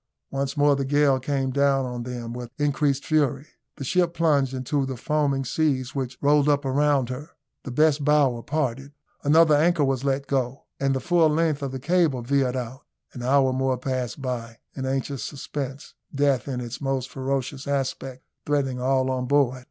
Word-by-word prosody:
Once 140 Hz, +1 st, -2 dB
more 145 Hz, 0 st, +4 dB
the 140 Hz, -, -1 dB
gale 140 Hz, -1 st, +3 dB
came 135 Hz, 0 st, -1 dB
down 140 Hz, 0 st, +2 dB
on 125 Hz, -1 st, -5 dB
them 120 Hz, -1 st, -5 dB
with 120 Hz, -1 st, -6 dB
increased 145 Hz, -1 st, +1 dB
fury. 145 Hz, -3 st, +1 dB, 0.3 s
The -, -, -7 dB
ship 170 Hz, +5 st, +1 dB
plunged 145 Hz, -5 st, +2 dB
into 135 Hz, +2 st, -1 dB
the 130 Hz, -1 st, -4 dB
foaming 140 Hz, 0 st, 0 dB
seas 135 Hz, -3 st, 0 dB
which 130 Hz, -2 st, -4 dB
rolled 145 Hz, 0 st, +4 dB
up 145 Hz, -1 st, +2 dB
around 140 Hz, -1 st, +2 dB
her. 135 Hz, +5 st, -6 dB, 0.4 s
The -, -, -5 dB
best 150 Hz, +3 st, +2 dB
bower 140 Hz, -5 st, +3 dB
parted. 135 Hz, -1 st, -2 dB, 0.3 s
Another 155 Hz, +2 st, +5 dB
anchor 160 Hz, +1 st, +3 dB
was 135 Hz, -1 st, 0 dB
let 140 Hz, 0 st, 0 dB
go, 135 Hz, -1 st, -2 dB, 0.2 s
and 135 Hz, -1 st, +1 dB
the -, -, 0 dB
full 175 Hz, -2 st, +3 dB
length 155 Hz, -1 st, +1 dB
of 140 Hz, -2 st, -3 dB
the 130 Hz, -, -5 dB
cable 150 Hz, -4 st, +1 dB
veered 130 Hz, 0 st, +1 dB
out. 125 Hz, +1 st, -5 dB, 0.3 s
An 125 Hz, -, -7 dB
hour 130 Hz, +1 st, +3 dB
more 130 Hz, 0 st, 0 dB
passed 125 Hz, -2 st, -3 dB
by 120 Hz, -4 st, -4 dB, 0.2 s
in 130 Hz, -1 st, -4 dB
anxious 135 Hz, 0 st, -2 dB
suspense; 140 Hz, -1 st, -6 dB, 0.2 s
death, 140 Hz, -2 st, +1 dB
in 125 Hz, -3 st, -3 dB
its 120 Hz, +2 st, -6 dB
most 135 Hz, -2 st, -1 dB
ferocious 135 Hz, 0 st, -3 dB
aspect, 135 Hz, -2 st, -3 dB, 0.2 s
threatening 135 Hz, -4 st, -1 dB
all 130 Hz, 0 st, +1 dB
on 125 Hz, -1 st, -2 dB
board. 135 Hz, -2 st, +2 dB
135 Hz, 180 wpm, -25 LUFS, 130-145 Hz, 0.4 s, Another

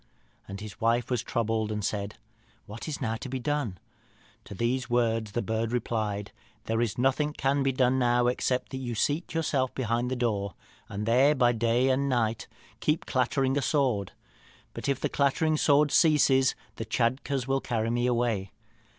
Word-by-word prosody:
"And 100 Hz, +1 st, -7 dB
his 105 Hz, +2 st, -9 dB
wife 115 Hz, +2 st, +1 dB
was 125 Hz, -3 st, +1 dB
troubled, 110 Hz, -3 st, -1 dB
and 105 Hz, -1 st, -2 dB
said, 100 Hz, 0 st, -3 dB, 0.5 s
'What 110 Hz, +8 st, -8 dB
is 155 Hz, -1 st, -4 dB
now 115 Hz, -3 st, -1 dB
to 130 Hz, -, -7 dB
be 130 Hz, -, -2 dB
done?' 130 Hz, -6 st, -2 dB, 0.7 s
To 100 Hz, -, -9 dB
these 120 Hz, +4 st, -1 dB
words 115 Hz, -3 st, +1 dB
the 120 Hz, -, -1 dB
bird 110 Hz, +1 st, -1 dB
replied, 110 Hz, -4 st, -2 dB, 0.3 s
'There 115 Hz, +1 st, 0 dB
is 115 Hz, -4 st, -1 dB
nothing 135 Hz, +4 st, +1 dB
can 140 Hz, 0 st, +1 dB
be 135 Hz, 0 st, +2 dB
done 130 Hz, 0 st, +2 dB
now, 120 Hz, -1 st, +3 dB
except 125 Hz, +1 st, 0 dB
you 130 Hz, -3 st, -4 dB
seat 150 Hz, +9 st, -1 dB
yourself 140 Hz, -5 st, 0 dB
behind 120 Hz, -1 st, -1 dB
the 130 Hz, -, -1 dB
door, 105 Hz, -6 st, -1 dB, 0.3 s
and 105 Hz, +2 st, -4 dB
there 130 Hz, +6 st, +4 dB
by 120 Hz, -3 st, +4 dB
day 120 Hz, +2 st, +2 dB
and 140 Hz, +1 st, +1 dB
night 115 Hz, -3 st, 0 dB, 0.3 s
keep 150 Hz, +6 st, 0 dB
clattering 130 Hz, +1 st, +1 dB
a -, -, -2 dB
sword. 125 Hz, -, 0 dB, 0.6 s
But -, -, -4 dB
if 135 Hz, -2 st, 0 dB
the -, -, 0 dB
clattering 150 Hz, +3 st, +1 dB
sword 145 Hz, -1 st, +3 dB
ceases, 135 Hz, -5 st, +4 dB, 0.2 s
the -, -, -4 dB
Tschadkurrs 130 Hz, +2 st, 0 dB
will 135 Hz, 0 st, +1 dB
carry 115 Hz, -2 st, -1 dB
me 120 Hz, +1 st, +1 dB
away. 115 Hz, -6 st, 0 dB
120 Hz, 175 wpm, -28 LUFS, 115-135 Hz, 0.7 s, there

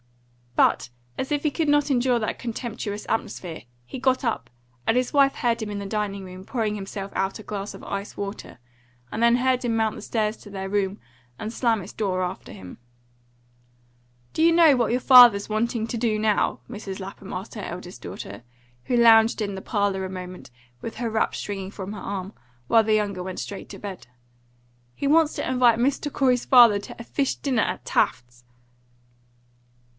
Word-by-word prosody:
But -, -, +3 dB, 0.3 s
as 265 Hz, -, -4 dB
if 290 Hz, -1 st, 0 dB
he 300 Hz, -, +1 dB
could 315 Hz, 0 st, 0 dB
not 290 Hz, 0 st, +3 dB
endure 250 Hz, -1 st, +2 dB
that 215 Hz, -, -3 dB
contemptuous 225 Hz, -3 st, -5 dB
atmosphere, 175 Hz, -6 st, -3 dB, 0.2 s
he 250 Hz, -, -7 dB
got 260 Hz, +1 st, +1 dB
up, 220 Hz, -, -2 dB, 0.4 s
and 225 Hz, -, +2 dB
his 250 Hz, -1 st, 0 dB
wife 275 Hz, -1 st, +4 dB
heard 235 Hz, -1 st, 0 dB
him 215 Hz, -, -4 dB
in 205 Hz, -1 st, -4 dB
the 200 Hz, -, -5 dB
dining 200 Hz, -1 st, -3 dB
room 185 Hz, 0 st, -10 dB
pouring 215 Hz, -1 st, -2 dB
himself 195 Hz, 0 st, -6 dB
out 195 Hz, 0 st, -1 dB
a -, -, -9 dB
glass 205 Hz, -1 st, -5 dB
of -, -, -12 dB
ice 200 Hz, +1 st, -5 dB
water, 200 Hz, +1 st, -6 dB, 0.5 s
and 220 Hz, -, -3 dB
then 235 Hz, +1 st, +5 dB
heard 255 Hz, 0 st, +1 dB
him 235 Hz, -2 st, 0 dB
mount 220 Hz, -1 st, +1 dB
the -, -, -8 dB
stairs 215 Hz, -1 st, -1 dB
to 205 Hz, -, -14 dB
their 195 Hz, -1 st, -5 dB
room, 200 Hz, 0 st, -1 dB, 0.4 s
and 220 Hz, +2 st, -5 dB
slam 230 Hz, -4 st, +1 dB
its -, -, -10 dB
door 185 Hz, -4 st, -1 dB
after 180 Hz, +1 st, -5 dB
him. 95 Hz, -1 st, -11 dB, 1.5 s
"Do -, -, -1 dB
you 335 Hz, -, +6 dB
know 330 Hz, -4 st, +6 dB
what 240 Hz, -2 st, +1 dB
your 245 Hz, -, +2 dB
father's 245 Hz, -6 st, +8 dB
wanting 220 Hz, +1 st, 0 dB
to 235 Hz, -, -3 dB
do 225 Hz, -2 st, +1 dB
now?" 215 Hz, -1 st, +1 dB
Mrs. 205 Hz, -4 st, -6 dB
Lapham 195 Hz, 0 st, -8 dB
asked 185 Hz, +3 st, -6 dB
her 215 Hz, -, -6 dB
eldest 180 Hz, -1 st, -7 dB
daughter, 100 Hz, +4 st, -8 dB, 0.4 s
who 245 Hz, -, +1 dB
lounged 225 Hz, -1 st, +6 dB
into 200 Hz, -2 st, -2 dB
the 190 Hz, -, -6 dB
parlour 200 Hz, -3 st, 0 dB
a 190 Hz, -, -4 dB
moment 180 Hz, -3 st, -8 dB, 0.3 s
with 225 Hz, -, -6 dB
her 230 Hz, -1 st, -3 dB
wrap 220 Hz, -, 0 dB
stringing 195 Hz, -2 st, -5 dB
from 200 Hz, 0 st, -6 dB
her 210 Hz, -, -7 dB
arm, 195 Hz, +1 st, -5 dB, 0.3 s
while 225 Hz, -, +5 dB
the 215 Hz, 0 st, +2 dB
younger 200 Hz, -3 st, -1 dB
went 185 Hz, 0 st, -5 dB
straight 200 Hz, -, -7 dB
to -, -, -9 dB
bed. 195 Hz, -9 st, -8 dB, 0.9 s
"He 280 Hz, -, -2 dB
wants 315 Hz, +1 st, +4 dB
to -, -, -3 dB
invite 245 Hz, -3 st, +4 dB
Mr. 280 Hz, +3 st, 0 dB
Corey's 255 Hz, -3 st, +2 dB
father 235 Hz, -5 st, +7 dB
to 200 Hz, -, -10 dB
a -, -, -6 dB
fish 275 Hz, +3 st, -1 dB
dinner 255 Hz, -6 st, 0 dB
at -, -, -3 dB
Taft's!" 120 Hz, 0 st, -1 dB
215 Hz, 190 wpm, -24 LUFS, 195-245 Hz, 1.5 s, father's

